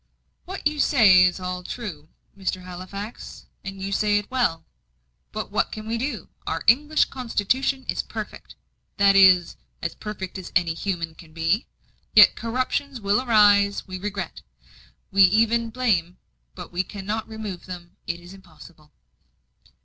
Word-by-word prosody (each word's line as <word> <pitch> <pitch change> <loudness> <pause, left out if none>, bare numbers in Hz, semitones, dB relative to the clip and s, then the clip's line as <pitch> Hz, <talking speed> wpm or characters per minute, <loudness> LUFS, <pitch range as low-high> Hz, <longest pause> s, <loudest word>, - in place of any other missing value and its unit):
"What 380 +2 -7
you 300 0 +1
say 200 -12 +6
is 180 +1 0
all 180 0 -4
true, 175 -7 -7 0.3
Mr. 185 -2 -3
Halifax; 185 +4 -8 0.2
and 195 0 -7
you 195 +1 -4
say 205 +1 +2
it 205 +2 -4
well. 235 -11 0 0.7
But - - -5
what - - 0
can 215 0 -7
we 230 +1 -2
do? 245 - -4 0.2
Our 165 - -2
English 295 +8 +4
constitution 260 +2 -1
is - - -1
perfect - - -8 0.4
that 200 -1 +5
is, 185 -3 +6 0.2
as - - -3
perfect 195 -3 -6
as 185 - -9
anything 170 -2 +2 0.2
human 165 -2 -5
can 160 -1 -16
be. 165 +7 0 0.5
Yet - - +8
corruptions 255 +3 -2
will 205 +2 +1
arise; 205 -4 +4
we 185 0 -6
regret, 200 0 -5 0.7
we 195 +1 +4
even 225 +4 +4
blame 205 -8 0 0.4
but - - -9
we 175 +1 0
cannot 205 +3 -5
remove 215 -5 -7
them. 175 -2 -9
It 170 0 -3
is 175 +2 -13
impossible." 165 -4 -16
200 Hz, 150 wpm, -24 LUFS, 180-225 Hz, 0.7 s, Yet